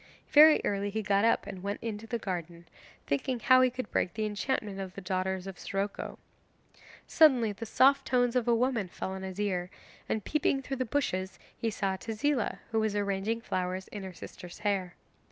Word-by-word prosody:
Very 305 +1 +8
early 200 0 0
he 220 +2 -3
got 200 +1 +3
up 230 - +3
and 185 - -7
went 200 +2 -3
into 225 -1 -5
the 235 - -1
garden, 170 -4 -5 0.4
thinking 235 - -1
how 255 +3 +6
he 255 - +5
could 250 -2 -6
break 175 - 0
the 215 -1 -1
enchantment 210 -1 -2
of 190 -2 -6
the - - -5
daughters 185 0 -2
of 195 -2 -8
Siroco. 200 +1 -3 0.9
Suddenly 255 -9 +5
the 225 +3 -7
soft 275 +5 +4
tones 245 -1 +2
of 245 -1 +1
a 235 - +4
woman 235 -4 +1
fell 185 - -5
on 190 0 -5
his 190 0 -6
ear, 180 -4 -1 0.4
and 220 - -1
peeping 280 -3 +1
through 270 +1 -4
the 255 - -1
bushes 190 -8 -1 0.2
he 230 - -1
saw 195 -3 -1
Tezila, 230 +4 -1
who 225 - +2
was 220 -1 0
arranging 205 +3 -1
flowers 185 -2 -3
in 205 - -7
her 190 -1 -6
sister's 175 +1 -10
hair. 195 -4 -1
205 Hz, 190 wpm, -30 LUFS, 190-240 Hz, 0.9 s, Very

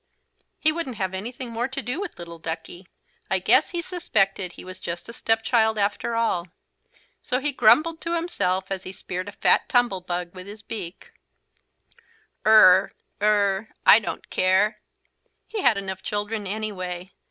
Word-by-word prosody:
He 310 - +3
wouldn't 310 -6 -4
have 190 -3 -2
anything 235 +5 -5
more 235 +2 -1
to 265 0 -4
do 265 +7 -3
with 405 - -6
little 170 -1 -9
Duckie. 165 +3 -6 0.4
I - - +2
guess - - +4
he 345 -2 -3
suspected 195 - 0
he - - -11
was 185 0 -9
just 170 0 -6
a 235 - -9
step 225 -1 +1
child 220 -2 +2
after 205 +3 -1
all. 220 -7 0 0.7
So 250 - -1
he 295 +2 -1
just 280 - -8
grumbled 305 +9 +4
to 335 0 -2
himself 190 - -1
as 190 -1 -2
he 185 - -8
speared 185 +1 -5
a - - -8
fat - - +2
tumble 245 -7 +2
bug 175 -1 -4
with 185 0 -10
his 210 +1 -10
beak: 195 -5 -7 1.4
"Ur, 195 -3 +7 0.3
ur 205 -1 +2 0.2
I 215 - +9
don't 210 - -6
care!" 195 +4 +2 0.7
He 435 - -4
had 240 -5 +4
enough 190 -1 -5
children 205 0 -3
anyway. 185 -3 -4
205 Hz, 165 wpm, -24 LUFS, 185-235 Hz, 1.4 s, I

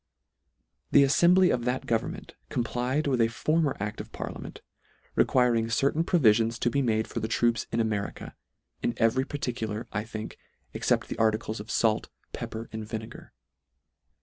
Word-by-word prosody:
The 140 - +6
aSfembly 175 +6 +5
of 120 - -1
that 125 +1 -1
government 115 -1 -2 0.2
com 120 - 0
plied 125 +5 -1
with 130 -4 +2
a 115 - +5
former 155 +5 0
acl: 105 +2 -4
of - - -8
parliament, - - -7 0.5
re - - +4
quiring 120 -3 +2
certain 140 +7 +2
provisions 115 - +3
to 120 - 0
be 140 - +1
made 110 -3 +1
for - - -4
the 110 - -2
troops 115 0 +1
in 115 - 0
America, 110 -3 -2 0.5
in 120 - -1
every 120 +3 +2
particular, 120 -6 -3
I 105 - -1
think, 110 -1 -7 0.3
except - - +1
the - - -6
articles 110 0 +1
of 105 +1 -9
fait, 110 0 +1 0.2
pepper, 115 +1 -5
and 110 0 -4
vinegar. 110 +1 -7
115 Hz, 160 wpm, -28 LUFS, 110-130 Hz, 0.5 s, The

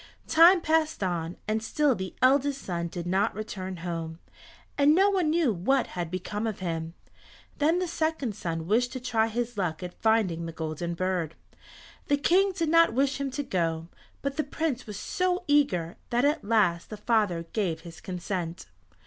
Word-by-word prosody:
Time 340 +3 +7
passed 315 -6 +1
on, 170 -2 -2
and 215 +1 0
still 290 +5 +2
the 190 -4 -5
eldest 275 +1 +4
son 170 -2 -2
did 170 0 -6
not 190 +5 +1
return 190 -3 -5
home, 165 -2 -4 0.6
and 290 +2 +5
no 390 +3 +5
one 365 -5 +1
knew 310 -7 +2
what 255 +9 +1
had 175 -2 -3
become 205 +5 -3
of 215 - -3
him. 165 -2 -4 0.6
Then 315 +4 +3
the 365 0 -1
second 315 -8 -1
son 165 -5 -4
wished 240 +7 +2
to 260 - -4
try 225 -3 +1
his 235 0 -3
luck 175 -2 -2
at 180 0 -8
finding 205 -7 +2
the - - -5
Golden 160 +2 -4
Bird. 180 -3 -1 0.7
The 285 - +3
King 380 +7 +3
did 335 -4 -1
not 330 -3 +5
wish 275 +2 +1
him 275 - -1
to 285 +3 -3
go, 165 - -1 0.3
but 280 +1 -2
the 310 - +1
Prince 285 -4 -3
was 210 -2 -6
so 365 - -1
eager 190 - +2
that 240 +3 +2
at 300 +3 +1
last 200 -6 +2
the 215 - -6
father 210 -6 +1
gave 175 -7 -1
his 170 0 -11
consent. 175 - -4
215 Hz, 180 wpm, -27 LUFS, 175-285 Hz, 0.7 s, Time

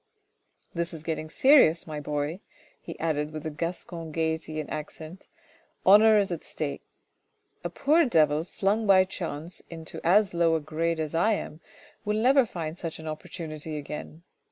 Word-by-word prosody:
" - - -35
This 170 0 -3
is 155 - -9
getting 155 -1 -3
serious, 260 - +5
my 155 -2 -5
boy," 150 +3 -3 0.4
he 165 - -9
added 150 -2 -1
with 155 0 -7
a 155 - -2
Gascon 165 +1 -5
gaiety 160 0 -2
and 155 - -4
accent. 155 +3 -7 0.3
" - - -36
Honour 215 +3 +7
is 200 -3 +1
at 170 - -4
stake. 145 -2 -4 0.8
A - - -2
poor 315 +4 +3
devil 155 - +3
flung 205 +5 -1
by 190 -1 +6
chance 170 -3 -6
into 165 -1 -8
as 195 +3 +4
low 170 -1 +3
a - - +1
grade 160 +2 -2
as 155 -1 -3
I 180 +7 +3
am 160 -5 -5 0.4
will 210 0 0
never 255 +2 +4
find 165 -3 -5
such 165 -2 -5
an 160 - -9
opportunity 155 0 -6
again. 150 +2 -7
165 Hz, 170 wpm, -27 LUFS, 155-185 Hz, 0.8 s, Honour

